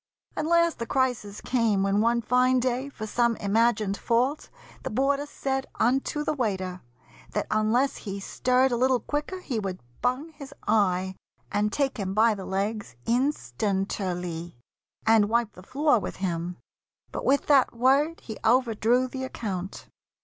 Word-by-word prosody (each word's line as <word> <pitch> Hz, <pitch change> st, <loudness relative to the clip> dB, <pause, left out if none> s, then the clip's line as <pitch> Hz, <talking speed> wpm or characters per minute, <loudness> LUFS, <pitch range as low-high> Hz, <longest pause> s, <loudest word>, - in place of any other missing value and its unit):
At 305 Hz, -, -1 dB
last 335 Hz, 0 st, +3 dB
the 230 Hz, -, -3 dB
crisis 245 Hz, -6 st, -1 dB
came, 225 Hz, -6 st, +1 dB
when 195 Hz, +1 st, +2 dB
one 235 Hz, +1 st, +2 dB
fine 250 Hz, +2 st, +3 dB
day, 255 Hz, +2 st, -1 dB
For 215 Hz, -6 st, -7 dB
some 235 Hz, +1 st, +1 dB
imagined 210 Hz, -1 st, +1 dB
fault, 250 Hz, +6 st, 0 dB, 0.3 s
the -, -, -4 dB
boarder 275 Hz, +5 st, +1 dB
said 270 Hz, -2 st, -2 dB
Unto 270 Hz, +5 st, +1 dB
the 305 Hz, -, 0 dB
waiter, 190 Hz, -8 st, -2 dB, 0.5 s
that -, -, 0 dB
unless 220 Hz, +5 st, +2 dB
he 200 Hz, -2 st, -6 dB
stirred 255 Hz, +6 st, +2 dB
A 240 Hz, -, +1 dB
little 255 Hz, +1 st, +3 dB
quicker 300 Hz, +8 st, -3 dB
he 245 Hz, -10 st, -2 dB
would 190 Hz, -3 st, -4 dB, 0.2 s
bung 260 Hz, +6 st, -1 dB
his 280 Hz, -2 st, -11 dB
eye, 190 Hz, -3 st, +2 dB, 0.4 s
And 205 Hz, +1 st, +1 dB
take 275 Hz, 0 st, 0 dB
him 195 Hz, -2 st, -3 dB
by 225 Hz, +1 st, +5 dB
the 195 Hz, -2 st, -7 dB
legs 200 Hz, -, -3 dB
instanter 195 Hz, -, 0 dB
ly 170 Hz, -1 st, -6 dB, 0.5 s
And 220 Hz, -2 st, +5 dB
wipe 235 Hz, -1 st, +1 dB
the 185 Hz, -, -13 dB
floor 275 Hz, -, +2 dB
with -, -, -5 dB
him. 175 Hz, -1 st, -3 dB, 0.5 s
But -, -, -4 dB
with 280 Hz, +1 st, +2 dB
that 275 Hz, -5 st, +4 dB
word 275 Hz, +7 st, +2 dB
He 220 Hz, -, -8 dB
overdrew 240 Hz, +1 st, +3 dB
the 260 Hz, +1 st, -5 dB
account. 195 Hz, -7 st, -5 dB
230 Hz, 155 wpm, -26 LUFS, 200-265 Hz, 0.5 s, by